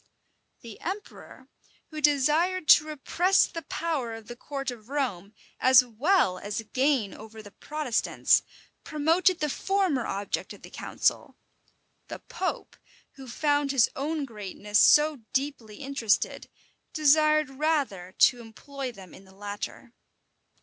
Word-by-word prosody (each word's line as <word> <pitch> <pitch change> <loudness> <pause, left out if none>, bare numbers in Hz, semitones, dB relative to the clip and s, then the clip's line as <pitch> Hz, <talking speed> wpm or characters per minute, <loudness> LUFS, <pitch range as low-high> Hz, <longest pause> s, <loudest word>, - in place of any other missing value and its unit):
The 230 -3 -11
emperor, 390 +4 -8 0.4
who 310 0 -6
desired 305 +5 +2
to 305 - +7
repress 345 +5 +2
the 330 - -7
power 295 -10 -3
of 225 -1 -12
the 240 - -7
court 275 +1 -5
of 230 -1 -13
Rome, 220 -9 -3 0.2
as 255 0 +6
well 240 - +1
as 205 +2 -4
gain 260 -6 +1
over 220 0 -11
the 205 - -13
Protestants, 295 -1 0 0.4
promoted 330 +4 +1
the 300 - +1
former 365 -4 0
object 200 +1 -4
of - - -16
the - - -12
council; - - -1 0.7
the - - -7
pope, 460 -6 -5 0.3
who 270 -2 -13
found 290 +3 0
his 265 -4 +3
own 295 +2 -2
greatness 210 -2 -2
so 300 0 +5 0.2
deeply 265 -6 -3
interested, 270 -6 -1 0.4
desired 305 -1 +3
rather 270 - -2
to 245 -2 +4
employ 260 +4 -7
them 190 -6 -14
in 195 - -15
the 190 0 -19
latter. 205 +4 -7
275 Hz, 130 wpm, -27 LUFS, 225-305 Hz, 0.7 s, to